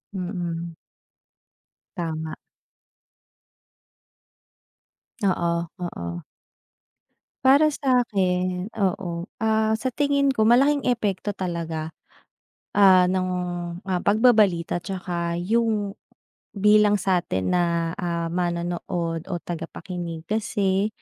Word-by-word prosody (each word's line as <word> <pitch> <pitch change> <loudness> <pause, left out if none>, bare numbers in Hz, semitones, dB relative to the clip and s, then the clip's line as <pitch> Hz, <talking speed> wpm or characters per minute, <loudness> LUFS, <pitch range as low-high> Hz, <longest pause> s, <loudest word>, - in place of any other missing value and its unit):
Mm. 175 -3 -4 1.2
Tama. 160 -2 -3 2.9
Oo, 170 -3 +1
oo. 85 - -5 1.2
Para 290 +3 +6
sa'kin, 190 -9 0
oo. 180 -4 -1 0.2
Ah, 220 0 +2
sa 235 +4 -1
tingin 280 +1 +1
ko 225 -5 +2
malaking 275 +5 +4
epekto 210 -4 0
talaga, 165 -4 -4 0.9
ah, 185 -3 +7
ng, 185 0 0 0.6
ah, 185 -2 0
pagbabalita 210 -6 +4
tsaka 175 -2 -3
yung 210 0 0 0.6
bilang 210 +1 +5
sa'tin 175 - 0
na, 170 -2 +1
ah, 170 -2 -2
manonood 170 -1 -2
o 180 - -2
tagapakinig. 170 0 -6
Kasi, 200 -1 0
185 Hz, 80 wpm, -24 LUFS, 170-215 Hz, 2.9 s, ah